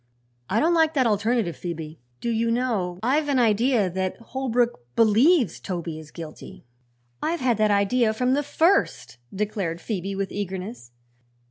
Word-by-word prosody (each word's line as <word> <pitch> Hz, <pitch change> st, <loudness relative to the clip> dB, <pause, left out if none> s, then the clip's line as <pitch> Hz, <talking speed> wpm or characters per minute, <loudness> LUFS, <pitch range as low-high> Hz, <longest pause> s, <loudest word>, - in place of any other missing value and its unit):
I 215 Hz, -, +2 dB
don't 330 Hz, +3 st, +3 dB
like 320 Hz, -1 st, +3 dB
that 260 Hz, -3 st, +3 dB
alternative, 215 Hz, -3 st, +1 dB
Phoebe. 160 Hz, -3 st, -6 dB, 0.2 s
Do 235 Hz, -, -1 dB
you 230 Hz, 0 st, 0 dB
know, 225 Hz, -7 st, -1 dB
I've 290 Hz, +5 st, +1 dB
an 275 Hz, -, +2 dB
idea 230 Hz, -1 st, +3 dB
that 185 Hz, +1 st, -3 dB
Holbrook 245 Hz, -, -1 dB, 0.2 s
believes 230 Hz, -, +4 dB
Toby 170 Hz, -4 st, -5 dB
is 155 Hz, -1 st, -12 dB
guilty?" 160 Hz, -6 st, -10 dB, 0.6 s
"I've 335 Hz, +2 st, -1 dB
had 250 Hz, -4 st, +1 dB
that 215 Hz, -1 st, +3 dB
idea 215 Hz, +3 st, +2 dB
from 250 Hz, +4 st, +1 dB
the 285 Hz, -, +2 dB
first," 330 Hz, -, +1 dB
declared 195 Hz, -4 st, -3 dB
Phoebe 195 Hz, -1 st, -4 dB
with 195 Hz, -1 st, -3 dB
eagerness. 190 Hz, -, -5 dB
220 Hz, 150 wpm, -24 LUFS, 190-255 Hz, 0.6 s, believes